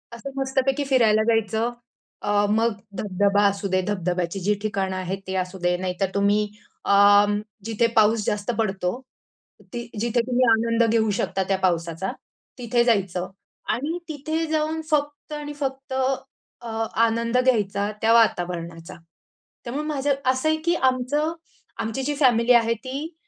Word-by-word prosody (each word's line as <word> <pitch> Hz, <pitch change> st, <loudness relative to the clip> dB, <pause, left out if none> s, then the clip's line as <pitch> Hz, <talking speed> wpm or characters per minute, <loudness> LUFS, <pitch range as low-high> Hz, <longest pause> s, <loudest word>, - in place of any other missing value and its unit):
असं 235 Hz, +4 st, -7 dB
मस्तपैकी 265 Hz, +1 st, 0 dB
फिरायला 225 Hz, -5 st, +4 dB
जायचं 225 Hz, +2 st, 0 dB, 0.5 s
अ, 205 Hz, 0 st, +2 dB
मग 225 Hz, +2 st, +2 dB, 0.2 s
धब-धबा 200 Hz, 0 st, +1 dB
असू 200 Hz, 0 st, -1 dB
दे, 185 Hz, 0 st, +1 dB
धबधब्याची 180 Hz, -2 st, -1 dB
जी 200 Hz, +3 st, +1 dB
ठिकाणं 195 Hz, -3 st, -2 dB
आहेत 185 Hz, +1 st, -3 dB
ते 190 Hz, -, -3 dB
असू 185 Hz, 0 st, -2 dB
दे, 175 Hz, 0 st, +1 dB
नाहीतर 185 Hz, +1 st, -2 dB
तुम्ही 205 Hz, +1 st, +2 dB, 0.4 s
अ, 205 Hz, +1 st, +6 dB, 0.4 s
जिथे 225 Hz, +1 st, +1 dB
पाऊस 220 Hz, 0 st, +4 dB
जास्त 210 Hz, +2 st, -1 dB
पडतो, 195 Hz, -1 st, -1 dB, 0.7 s
ती 240 Hz, 0 st, -5 dB
जिथे 235 Hz, +2 st, 0 dB
तुम्ही 255 Hz, 0 st, +2 dB
आनंद 230 Hz, +1 st, +3 dB
घेऊ 220 Hz, -1 st, +2 dB
शकता 190 Hz, -, 0 dB
त्या 195 Hz, -, +1 dB
पावसाचा, 170 Hz, 0 st, -1 dB, 0.5 s
तिथे 240 Hz, -1 st, +1 dB
जायचं 195 Hz, -6 st, +1 dB, 0.5 s
आणि 300 Hz, +7 st, -2 dB
तिथे 315 Hz, +2 st, -2 dB
जाऊन 315 Hz, +1 st, -1 dB
फक्त 295 Hz, 0 st, -1 dB
आणि 295 Hz, 0 st, -5 dB
फक्त 270 Hz, -1 st, -4 dB, 0.7 s
अ, 235 Hz, -, -8 dB, 0.4 s
आनंद 230 Hz, +1 st, 0 dB
घ्यायचा 210 Hz, -5 st, +1 dB
त्या 225 Hz, +1 st, +4 dB
वातावरणाचा. 175 Hz, -5 st, 0 dB, 0.7 s
त्यामुळे 275 Hz, +5 st, -4 dB
माझं, 285 Hz, -1 st, 0 dB
असं 260 Hz, +4 st, +2 dB
आहे 315 Hz, -, +2 dB
की 340 Hz, 0 st, +3 dB
आमचं 265 Hz, +4 st, +1 dB, 0.5 s
आमची 225 Hz, +5 st, -2 dB
जी 290 Hz, +2 st, -1 dB
फॅमिली 245 Hz, -2 st, +4 dB
आहे 230 Hz, -1 st, +4 dB
ती 280 Hz, +6 st, -5 dB
225 Hz, 140 wpm, -24 LUFS, 195-260 Hz, 0.7 s, अ